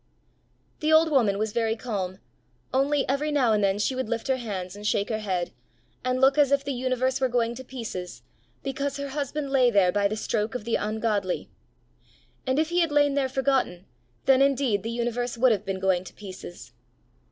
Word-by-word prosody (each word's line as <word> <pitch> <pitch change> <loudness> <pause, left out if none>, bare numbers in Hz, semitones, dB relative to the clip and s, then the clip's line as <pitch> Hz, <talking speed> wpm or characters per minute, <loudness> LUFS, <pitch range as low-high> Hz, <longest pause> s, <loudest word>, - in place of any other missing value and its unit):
The 310 +1 +1
old 320 0 +5
woman 225 -8 +3
was 215 +1 -1
very 225 0 0
calm, 200 -6 -4 0.6
only 275 +2 +2
every 285 +3 0
now 260 -6 +3
and 210 -1 +2
then 195 0 +2
she 210 +5 0
would 255 -3 -3
lift 235 +2 -3
her 265 - +3
hands 195 -6 -5
and 205 +1 -5
shake 200 -1 +1
her 220 -1 -1
head, 185 -5 -2 0.5
and 255 0 0
look 270 +2 +4
as 285 -2 +4
if 280 0 +3
the 280 0 -2
universe 255 +1 0
were 260 - +2
going 235 -1 +1
to 260 +2 -8
pieces, 200 - -7 0.4
because 275 +1 -2
her 280 0 -4
husband 285 0 -3
lay 255 -3 +5
there 195 -5 +4
by 200 +1 +2
the 215 +2 -3
stroke 215 +1 -1
of 250 - -3
the 235 - -2
ungodly. 210 -3 -1 1.0
And 260 +1 +1
if 315 +1 +2
he 350 +1 +1
had 335 -3 +2
lain 290 -1 +3
there 275 -2 +1
forgotten, 260 -9 0 0.4
then 270 0 +5
indeed 270 -7 +2
the 225 - -4
universe 240 +1 -2
would 255 +1 +5
have 210 -2 0
been 190 -1 -2
going 190 -1 +1
to - - -11
pieces! 185 - -10
245 Hz, 200 wpm, -26 LUFS, 205-275 Hz, 1.0 s, old